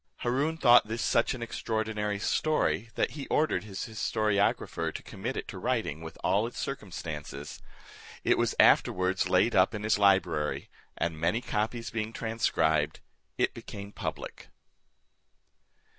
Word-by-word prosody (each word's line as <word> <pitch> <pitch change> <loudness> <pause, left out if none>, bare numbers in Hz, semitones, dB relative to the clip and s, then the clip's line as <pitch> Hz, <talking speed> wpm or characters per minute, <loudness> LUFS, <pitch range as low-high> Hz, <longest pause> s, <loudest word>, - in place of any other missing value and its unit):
Haroon 140 +7 0
thought 120 -7 +6
this 115 +2 -3
such 115 - +2
an 120 - -6
extraordinary 110 -2 -2
story, 115 -1 0
that - - +1
he 140 -2 -7
ordered 155 -7 +1
his 100 -3 -5
historiographer 110 -2 0
to - - -7
commit - - -5
it - - -4
to - - -7
writing 75 +3 -1
with 80 0 -9
all 105 +3 +2
its 120 - -10
circumstances. 80 - -6 0.6
It - - +4
was - - 0
afterwards 95 +1 +4
laid 95 +6 +3
up 95 +3 +4
in 105 - -5
his 110 -1 +2
library, 95 -7 +2 0.3
and 80 -2 -2
many 85 +8 +2
copies 115 0 -2
being 110 0 -3
transcribed, 80 -10 +1 0.4
it - - +1
became 100 0 -8
public. - - -6
105 Hz, 140 wpm, -29 LUFS, 95-115 Hz, 0.6 s, thought